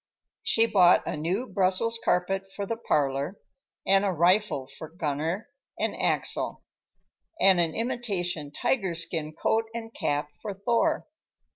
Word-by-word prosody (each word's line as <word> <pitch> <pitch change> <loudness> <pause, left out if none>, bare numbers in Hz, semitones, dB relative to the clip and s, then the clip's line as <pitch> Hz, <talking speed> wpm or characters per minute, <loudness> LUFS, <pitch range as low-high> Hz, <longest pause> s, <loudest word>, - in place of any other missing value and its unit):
She 225 - +4
bought 180 -5 +5
a - - -2
new 175 +10 -1
Brussels 210 +2 +1
carpet 195 +2 0
for 200 - -3
the 230 - -2
parlor, 145 -4 -1 0.5
and 195 0 +4
a 200 - +1
rifle 180 -3 +2
for 155 +3 -10
Gunner 165 - -3 0.3
and - - -1
Axel, - - -1 0.8
and 190 -2 +5
an 165 -2 +1
imitation 200 - -2
tiger 190 - 0
skin 165 -2 0
coat 220 +8 0
and 225 -1 -6
cap 145 0 -1
for 205 -3 -5
Thor. 235 +10 +1
190 Hz, 135 wpm, -27 LUFS, 160-220 Hz, 0.8 s, bought